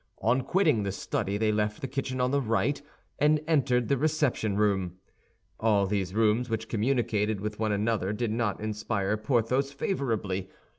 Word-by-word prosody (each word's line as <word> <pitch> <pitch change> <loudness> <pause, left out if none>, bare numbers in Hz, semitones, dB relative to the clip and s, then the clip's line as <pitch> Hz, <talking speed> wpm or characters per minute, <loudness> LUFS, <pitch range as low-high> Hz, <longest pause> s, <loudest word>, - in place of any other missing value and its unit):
On 120 +5 +3
quitting 155 - +2
the 100 -1 -2
study 100 +1 -2
they 110 0 +2
left 105 0 -1
the 135 - -4
kitchen 130 0 -3
on 125 0 +1
the 140 0 +2
right, 115 +4 0 0.4
and 150 +1 +4
entered 125 -6 +2
the 140 -2 +1
reception 145 -9 +1
room. 95 -4 +1 0.6
All 105 -3 +3
these 95 -1 -2
rooms, 115 +2 +2
which 110 0 -2
communicated 110 -3 0
with 105 +1 -5
one 110 -1 0
another, 105 -1 0
did 110 +1 -2
not 110 -3 -1
inspire 105 -1 -1
Porthos 125 +4 0
favorably. 115 - -2
110 Hz, 160 wpm, -28 LUFS, 105-130 Hz, 0.6 s, and